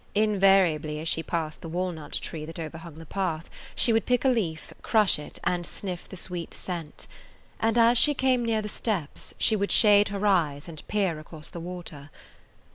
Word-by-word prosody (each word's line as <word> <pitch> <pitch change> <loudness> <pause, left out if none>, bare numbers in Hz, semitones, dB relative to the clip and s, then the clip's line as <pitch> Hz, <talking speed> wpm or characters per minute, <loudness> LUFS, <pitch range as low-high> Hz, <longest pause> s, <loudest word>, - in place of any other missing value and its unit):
Invariably, 195 -7 +3
as 160 - -4
she 165 - +1
passed 160 -2 -3
the 165 - -7
walnut 175 -3 -4
tree 155 -2 -3
that 165 +1 -8
overhung 165 0 -7
the 165 +1 -11
path, 170 -2 -3 0.2
she 235 - +4
would 225 - +1
pick 250 +1 +2
a - - +6
leaf, 185 -11 -2
crush 210 -8 +3
it, 150 - -9
and 175 -1 0
sniff 180 0 -6
the 190 - -8
sweet 175 -2 -5
scent; 170 -5 -5 0.5
and 225 +1 +1
as 235 0 +6
she 295 -1 +5
came 255 -2 +2
near 225 -2 0
the - - -4
steps 195 -8 -3
she 220 - +3
would 200 -1 -1
shade 205 -1 +6
her 200 0 -3
eyes 160 -8 +1
and 155 -3 -8
peer 190 -7 0
across 155 0 -9
the 170 - -8
water. 165 -4 -8
180 Hz, 190 wpm, -27 LUFS, 160-210 Hz, 0.5 s, a